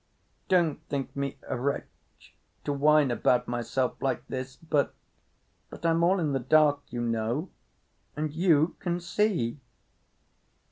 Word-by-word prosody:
"Don't 170 Hz, -5 st, +2 dB
think 140 Hz, -2 st, -3 dB
me 140 Hz, -1 st, -3 dB
a -, -, -2 dB
wretch 140 Hz, +3 st, -5 dB, 0.3 s
to 145 Hz, -, -1 dB
whine 150 Hz, -1 st, +4 dB
about 125 Hz, 0 st, +2 dB
myself 120 Hz, +1 st, -2 dB
like 135 Hz, -1 st, -1 dB
this, 130 Hz, 0 st, -5 dB
but—but 160 Hz, +1 st, -5 dB
I'm 165 Hz, 0 st, +3 dB
all 185 Hz, +3 st, +4 dB
in 155 Hz, -4 st, 0 dB
the 135 Hz, -, +1 dB
dark, 145 Hz, +2 st, +4 dB
you 120 Hz, -, -4 dB
know, 115 Hz, +8 st, -1 dB, 0.6 s
and 150 Hz, 0 st, -2 dB
you 165 Hz, -1 st, +3 dB
can 175 Hz, -1 st, -1 dB
see." 175 Hz, -, 0 dB
145 Hz, 130 wpm, -28 LUFS, 130-165 Hz, 0.6 s, whine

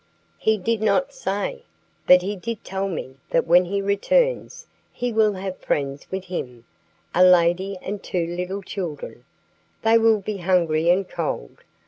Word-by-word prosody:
"He 220 Hz, 0 st, +2 dB
did 220 Hz, +3 st, -1 dB
not 270 Hz, +7 st, +1 dB
say; 260 Hz, -, -3 dB, 0.5 s
but 180 Hz, 0 st, +7 dB
he 205 Hz, +2 st, -2 dB
did 225 Hz, +3 st, -6 dB
tell 195 Hz, +1 st, -3 dB
me 135 Hz, -6 st, -6 dB
that -, -, +2 dB
when 175 Hz, +2 st, +5 dB
he 200 Hz, +2 st, -2 dB
returns -, -, +1 dB, 0.3 s
he 245 Hz, -1 st, -3 dB
will 215 Hz, -1 st, +3 dB
have 190 Hz, -1 st, -6 dB
friends 140 Hz, -1 st, -2 dB
with 190 Hz, 0 st, -4 dB
him 125 Hz, -10 st, -6 dB, 0.5 s
a 180 Hz, -, +5 dB
lady 180 Hz, +2 st, +4 dB
and 205 Hz, 0 st, -4 dB
two 175 Hz, -2 st, -2 dB
little 180 Hz, +3 st, -4 dB
children. 175 Hz, -6 st, -6 dB, 0.6 s
They 225 Hz, +1 st, +5 dB
will 225 Hz, -1 st, +4 dB
be 205 Hz, +1 st, -4 dB
hungry 170 Hz, -3 st, +2 dB
and 185 Hz, +2 st, +3 dB
cold. 150 Hz, -, -4 dB
190 Hz, 155 wpm, -23 LUFS, 175-210 Hz, 0.6 s, but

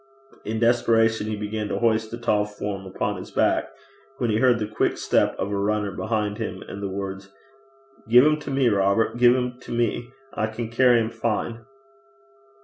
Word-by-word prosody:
In 110 Hz, +1 st, -2 dB
desperation 115 Hz, -2 st, +2 dB
he 110 Hz, -, -2 dB
began 105 Hz, +1 st, -4 dB
to -, -, -2 dB
hoist 110 Hz, -1 st, +1 dB
the 120 Hz, -, -6 dB
tall 110 Hz, -3 st, +1 dB
form 100 Hz, -2 st, -6 dB
upon 95 Hz, -, -2 dB
his -, -, -8 dB
back, -, -, +1 dB, 0.5 s
when 120 Hz, -4 st, 0 dB
he 105 Hz, -, +1 dB
heard 125 Hz, 0 st, +4 dB
the 110 Hz, -, -2 dB
quick 110 Hz, +1 st, -1 dB
step -, -, +1 dB
of 100 Hz, -, -3 dB
a -, -, -1 dB
runner 105 Hz, 0 st, 0 dB
behind 105 Hz, -1 st, -2 dB
him -, -, -5 dB
and 100 Hz, -, -7 dB
the 100 Hz, -, -3 dB
words 100 Hz, 0 st, -6 dB, 0.8 s
'Gie 115 Hz, +2 st, +5 dB
'im 150 Hz, +4 st, +6 dB
to 150 Hz, -, -8 dB
me, 135 Hz, -2 st, +2 dB
Robert; 100 Hz, +2 st, +2 dB
gie 120 Hz, 0 st, +5 dB
'im 125 Hz, 0 st, +2 dB
to -, -, -11 dB
me. 120 Hz, 0 st, -1 dB, 0.2 s
I 110 Hz, -, -1 dB
can 110 Hz, +1 st, -5 dB
carry 120 Hz, 0 st, +4 dB
'im 110 Hz, 0 st, -1 dB
fine.' 115 Hz, 0 st, -3 dB
110 Hz, 190 wpm, -24 LUFS, 105-120 Hz, 0.8 s, im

